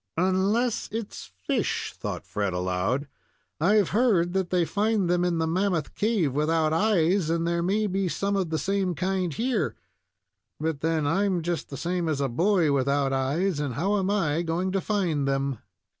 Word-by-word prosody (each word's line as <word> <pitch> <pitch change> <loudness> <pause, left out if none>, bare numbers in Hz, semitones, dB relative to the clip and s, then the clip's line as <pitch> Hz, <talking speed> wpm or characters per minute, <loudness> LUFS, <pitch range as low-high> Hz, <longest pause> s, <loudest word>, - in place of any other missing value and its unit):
"Unless 195 +7 +1
it's 225 -2 -6 0.2
fish," - - -1
thought - - -5
Fred, 100 -3 -2
aloud. 90 +10 -1 0.5
"I've 200 +4 +3
heard 200 -7 +2
that 190 -2 0
they 180 -2 +2
find 210 0 +1
them 175 0 +2
in 175 -1 +1
the 160 - +1
Mammoth 180 0 0
Cave 205 - +1
without 155 +2 +1
eyes, 185 -2 +2
and 165 0 0
there 170 0 0
may 200 +5 +1
be 190 -2 -1
some 200 +5 -1
of 190 -4 0
the 160 - -1
same 190 0 0
kind 185 0 -1
here; 220 - -1 0.8
but 155 -2 -2
then 160 -2 0
I'm 185 +2 +1
just 170 -2 -3
the 140 - -6
same 175 +1 -1
as 150 -3 -1
a 140 - +1
boy 170 - +2
without 140 0 +1
eyes, 145 +6 0
and 140 -5 -2
how 195 - +1
am 190 0 -1
I 170 -6 +1
going 175 +3 -1
to 195 0 0
find 175 -10 0
them?" 135 -3 -1
175 Hz, 175 wpm, -26 LUFS, 150-195 Hz, 0.8 s, I've